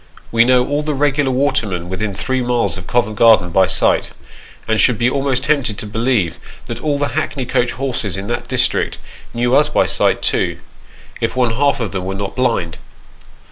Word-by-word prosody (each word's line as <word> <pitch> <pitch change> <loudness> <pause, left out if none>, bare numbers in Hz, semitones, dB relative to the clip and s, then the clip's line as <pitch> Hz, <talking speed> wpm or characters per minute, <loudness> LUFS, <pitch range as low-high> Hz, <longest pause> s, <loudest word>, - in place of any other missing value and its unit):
We 115 0 +4
know 125 0 +4
all 145 +1 0
the 150 -1 -2
regular 145 0 +1
watermen 120 -10 0
within 95 +2 -3
three 130 +5 -1
miles 120 -7 0
of 90 -2 -9
Covent 110 -3 0
Garden 110 -7 +5
by 95 +2 +3
sight, - - +2 0.5
and 110 0 +1
should 125 -4 +3
be 120 - +2
almost 135 -1 0
tempted 140 -8 0
to - - -6
believe 110 -4 -1 0.3
that 120 0 -6
all 150 -2 0
the 145 0 -1
hackney 145 -4 -3
coach 120 0 0
horses 120 -7 -3
in 95 - -5
that 120 +3 -4
district - - 0 0.3
knew 120 +2 +1
us 150 +1 +4
by - - +2
sight - - +1
too, - - +1 0.6
if - - -2
one 125 -2 +2
half 140 +2 +1
of 115 -5 -3
them 95 -2 -4
were 95 +1 -3
not 100 0 -5
blind. 115 -11 -1
120 Hz, 190 wpm, -17 LUFS, 100-135 Hz, 0.6 s, Garden